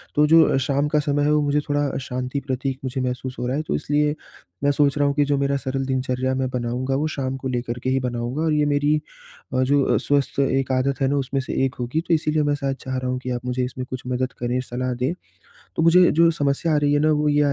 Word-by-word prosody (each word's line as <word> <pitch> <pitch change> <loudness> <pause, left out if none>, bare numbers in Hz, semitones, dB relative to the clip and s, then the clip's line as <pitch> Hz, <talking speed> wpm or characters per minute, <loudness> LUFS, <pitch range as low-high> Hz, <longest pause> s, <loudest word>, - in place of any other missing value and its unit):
तो 150 - +5
जो 160 -3 +5
शाम 140 +2 0
का 150 0 +2
समय 145 -1 0
है 150 - +2
वो 150 - +3
मुझे 145 0 +1
थोड़ा 145 0 +1
शांति 125 +2 -3
प्रतीक 130 0 -2
मुझे 130 0 -3
महसूस 125 0 -3
हो 125 - -2
रहा 130 +3 -1
है 155 - -2
तो - - 0
इसलिए 150 - +1 0.5
मैं 145 - +4
सोच 140 0 +2
रहा 145 - +2
हूँ 140 - +1
कि 145 - +3
जो 145 0 +1
मेरा 140 0 +1
सरल 135 0 -3
दिनचर्या 130 0 -1
मैं 130 0 0
बनाऊँगा, 125 +2 -2
वो 150 +3 0
शाम 135 -1 -2
को 135 - -5
लेकर 120 -1 -3
के 130 - 0
ही 135 0 +2
बनाऊँगा 125 +3 -3
और 160 -2 +1
ये 150 0 +2
मेरी 145 +1 +2 0.6
अ, 130 0 +2
जो 140 +1 +2
स्वस्थ 140 -1 0
एक 135 -1 +1
आदत 135 +1 0
है 135 - +3
ना 140 - +1
उसमें 135 0 -1
से - - -5
1 130 - -3
होगी 125 +7 -1
तो 170 - +2
इसीलिए 155 -1 +1
मैं 145 0 +1
शायद 135 -1 -2
चाह 130 -1 -3
रहा 130 0 -2
हूँ 125 - -2
कि 130 - -6
आप 120 0 -4
मुझे 125 0 -1
इसमें 130 0 -6
कुछ 130 -1 -5
मदद 125 0 -1
करें 120 +1 -1
सलाह 125 0 -3
दें, 125 +6 -1 0.6
तो 160 - +1
मुझे 175 +2 +6
जो 165 +2 +5
समस्या 150 +1 0
आ - - +3
रही 145 0 +2
है 145 - +3
ना 155 +1 +3
वो 150 0 +1
ये 145 0 +3
135 Hz, 260 wpm, -22 LUFS, 130-145 Hz, 0.6 s, मुझे